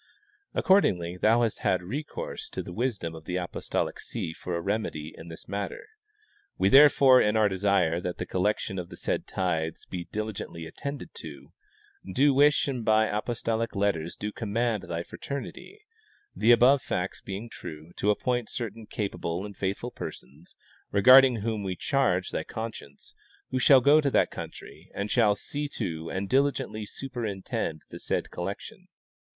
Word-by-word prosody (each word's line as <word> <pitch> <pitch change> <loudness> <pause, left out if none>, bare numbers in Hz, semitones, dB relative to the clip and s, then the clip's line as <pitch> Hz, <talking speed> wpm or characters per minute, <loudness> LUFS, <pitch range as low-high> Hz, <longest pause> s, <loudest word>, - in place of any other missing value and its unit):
Accordingly 90 - +3
thou 115 +6 +3
hast 115 - -1
had 90 -1 +1
recourse 140 - -5
to - - -5
the 90 - -8
wisdom 105 -7 -2
of 80 -1 -11
the 90 - -3
apostolic 90 -1 -2
see 80 - -5
for 90 +1 -5
a - - -1
remedy 85 -5 -3
in 80 - -11
this 80 -1 -9
matter. 100 - -4 0.7
We 95 - +3
therefore, 135 -1 +7
in 105 +1 +2
our 110 -1 +5
desire 95 -4 +1
that 90 0 -4
the - - -3
collection 95 0 -1
of 85 - -6
the - - -10
said - - -2
tithes 80 -4 -2
be 90 -1 -6
diligently 105 -4 -5
attended 140 - -6
to, - - -9 0.6
do 140 +1 +5
wish 145 +2 +4
and 130 -4 -2
by 110 -1 +3
apostolic 115 0 -2
letters 100 -5 0
do 105 - -4
command 110 0 -1
thy 85 0 -2
fraternity, 140 - -7 0.5
the 115 - +4
above 125 +3 +6
facts 95 -4 -3
being 100 +4 -6
true, 80 -6 -9
to 105 - +1
appoint 120 +2 0
certain 115 -2 -5
capable 95 -3 -3
and 100 -1 -9
faithful 100 +6 -3
persons, 70 +7 -9 0.4
regarding 130 +5 +8
whom 110 -1 -2
we 95 -2 -3
charge 95 -7 +1
thy - - -2
conscience, 110 -11 -8 0.4
who 130 - 0
shall 130 0 +7
go 145 +4 +6
to 145 - +1
that - - +2
country - - -9
and 100 +1 -3
shall 110 -4 +4
see 145 +7 -4
to 80 - -4
and 95 +1 -3
diligently 130 -4 0
superintend 105 - -4
the - - -8
said - - -2
collection. - - -6
105 Hz, 160 wpm, -27 LUFS, 90-125 Hz, 0.7 s, regarding